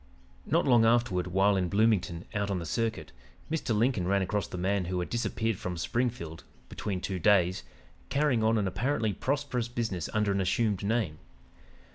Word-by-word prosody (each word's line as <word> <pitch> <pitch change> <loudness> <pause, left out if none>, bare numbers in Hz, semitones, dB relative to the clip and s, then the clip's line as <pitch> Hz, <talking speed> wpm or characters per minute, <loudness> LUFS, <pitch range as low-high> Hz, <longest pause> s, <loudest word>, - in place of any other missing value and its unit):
"Not 165 +3 +2
long 120 -4 +5
afterward, 115 -6 +2
while 95 +3 +3
in 90 -2 0
Bloomington, 100 -5 +1
out 100 -1 -1
on 100 - 0
the 85 - -4
circuit, 110 - -2 0.4
Mr. 135 -9 0
Lincoln 110 -5 +1
ran 100 0 +2
across 105 +2 -1
the - - -7
man 95 +1 0
who 90 +1 -2
had 90 - -4
disappeared 115 -2 -1
from 90 -1 -4
Springfield 85 -4 -2 0.3
'between 95 -3 -4
two 95 -2 -3
days,' 95 -2 +3 0.5
carrying 140 -3 +2
on 110 +1 +3
an 100 -2 +1
apparently 115 +1 0
prosperous 130 0 -1
business 110 -8 -3
under 105 -2 +1
an 100 0 +1
assumed 100 +1 0
name. 100 -7 -1
105 Hz, 170 wpm, -29 LUFS, 90-115 Hz, 0.5 s, long